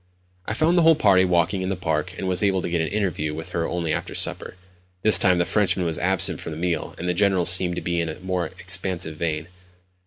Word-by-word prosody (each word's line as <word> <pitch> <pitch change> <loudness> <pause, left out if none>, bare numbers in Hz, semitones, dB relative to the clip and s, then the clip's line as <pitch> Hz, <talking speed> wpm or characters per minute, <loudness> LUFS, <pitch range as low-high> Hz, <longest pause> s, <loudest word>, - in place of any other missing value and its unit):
I 110 - -2
found 165 +6 +3
the - - +4
whole 165 0 +6
party 100 -9 +4
walking 90 +2 +1
in 95 - -2
the 95 - -1
park, 85 0 -2
and 95 - -4
was 90 -1 0
able 95 -3 +1
to - - -3
get 85 -1 +1
an 80 - -1
interview 85 -7 -2
with 80 0 -7
her 85 -1 -2
only 85 -3 -2
after - - -4
supper. - - -2 0.5
This 110 - +6
time 90 -2 +3
the 85 - +1
Frenchman 95 -3 +1
was 80 -2 -1
absent 95 +1 +1
from 80 - -6
the - - -7
meal, 85 -2 -2
and 90 - -5
the 90 - +1
General 95 -1 +2
seemed 90 -1 +2
to - - -4
be 85 -1 -1
in 85 - -3
a 80 - -7
more 90 -2 -2
expansive 90 -2 -1
vein. 80 -1 -3
90 Hz, 245 wpm, -23 LUFS, 85-95 Hz, 0.5 s, whole